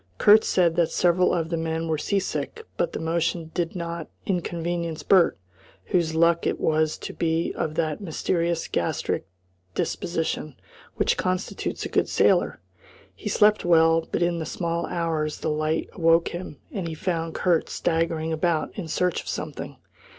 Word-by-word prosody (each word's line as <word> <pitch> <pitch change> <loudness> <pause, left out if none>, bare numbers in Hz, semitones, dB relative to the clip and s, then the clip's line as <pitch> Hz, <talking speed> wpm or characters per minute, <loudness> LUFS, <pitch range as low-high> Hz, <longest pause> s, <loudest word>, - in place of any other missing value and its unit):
Kurt 210 - +7
said 170 -3 +2
that 170 -2 +3
several 180 +1 +3
of 165 -2 0
the 165 - -1
men 165 0 -2
were 160 -2 0
sea 200 - 0
sick, 450 - -3
but - - -1
the - - -3
motion 165 0 -1
did 170 0 -2
not 170 -2 -4 0.2
inconvenience 170 -3 -2
Bert, 185 0 +4 0.5
whose 165 - +1
luck 170 +1 +3
it - - -1
was 155 0 +1
to - - -7
be 165 0 0
of 155 - -2
that 155 +2 -1
mysterious 170 -1 -1
gastric 85 - -1 0.5
disposition 160 -5 -2 0.4
which - - +1
constitutes 185 +1 -2
a - - -4
good - - +1
sailor. - - +3 0.5
He - - -6
slept 210 0 +4
well, 165 -1 +4
but - - +1
in 175 -1 0
the 160 - -3
small 170 0 -2
hours 160 -3 -2
the - - -1
light 155 +1 0
awoke 165 -1 +3
him, 175 -4 -7
and 185 -4 -3
he 160 - -4
found 165 -1 -2
Kurt 175 -3 +2
staggering 165 -1 0
about 160 -1 0
in 185 -5 -5
search 180 +3 0
of - - -16
something. - - -5
165 Hz, 165 wpm, -25 LUFS, 160-175 Hz, 0.5 s, Kurt